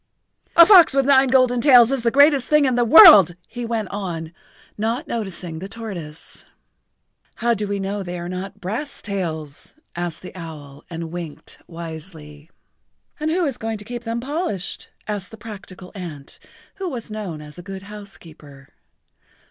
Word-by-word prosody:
"A 335 - +10
fox 350 -8 +7
with 275 -1 +3
nine 270 -1 +5
golden 255 -2 +3
tails 245 -3 +7
is 270 -2 0
the 235 - +2
greatest 285 +1 +4
thing 300 -1 +4
in 260 - +1
the 240 0 +2
world," 230 - +9
he 240 +1 -6
went 225 -3 -2
on, 170 -5 -5 0.4
not 230 +8 -2
noticing 185 -8 -5
the 190 +3 -7
tortoise. 185 -9 -8 0.9
"How 235 0 +1
do 210 -2 -3
we 200 0 -2
know 200 +1 -3
they 180 -1 -6
are 175 0 -6
not 190 +3 -6
brass 225 +10 -5
tails?" 160 -8 -5 0.2
asked 175 -1 -5
the 185 - -10
owl, 150 -5 -10
and 165 -1 -6
winked 170 -3 -8
wisely. 160 -2 -9 0.7
"And 305 +1 -1
who 345 +2 +1
is 275 -5 -3
going 225 0 -3
to 205 - -12
keep 240 +1 -7
them 230 0 -3
polished?" 285 - -4 0.2
asked 205 -3 -4
the 225 - -12
practical 195 -4 -11
ant, 165 -8 -9 0.4
who 385 -2 -4
was 235 -6 -7
known 200 -7 -5
as 150 +2 -11
a - - -7
good 190 +1 -8
housekeeper. 165 -9 -11
200 Hz, 165 wpm, -21 LUFS, 170-240 Hz, 0.9 s, A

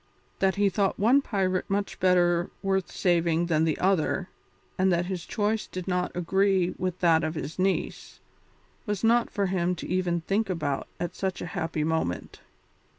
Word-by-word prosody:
That 190 -1 +2
he 205 0 +3
thought 195 0 0
one 245 +7 +4
pirate 190 -7 -1
much 200 0 -2
better 175 -1 +3
worth 190 -1 0
saving 170 -2 +1
than 160 -2 +2
the 155 -2 0
other, 185 0 +1 0.5
and 185 0 +2
that 175 0 +1
his 180 -2 -5
choice 215 +1 -1
did 185 0 -7
not 180 -1 0
agree 190 +1 +2
with 185 -1 -2
that 165 -2 +4
of 155 - -2
his 155 +3 -6
niece, 190 +1 -1 0.7
was 205 -1 -2
not 235 +1 +3
for 200 - -1
him 180 -1 0
even 180 -1 0
to - - -31
think 205 +1 0
about 150 -6 -2
at 175 - -3
such 190 -2 -3
a - - -4
happy 165 -4 -2
moment. 160 - -2
185 Hz, 170 wpm, -27 LUFS, 170-195 Hz, 0.7 s, one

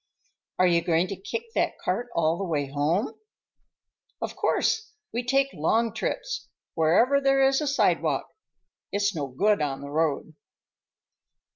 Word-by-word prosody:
"Are 185 - +4
you 170 -1 +4
going 170 0 +2
to 195 - -3
kick 455 - -6
that - - 0
cart 245 - -2
all 165 -1 +2
the - - -2
way 155 -6 -1
home?" 145 - -1 1.0
"Of - - -4
course. 440 0 0 0.2
We 240 - -1
take 270 +2 +1
long 220 +9 +1
trips; - - -3 0.3
wherever 230 - +3
there 270 0 +4
is 270 +2 +2
a 300 - -1
sidewalk. 280 - +1 0.6
It's 200 0 +1
no 145 -5 -3
good 205 +10 +1
on 140 -2 -2
the 140 0 -8
road." 155 0 0
200 Hz, 145 wpm, -26 LUFS, -, 1.0 s, Are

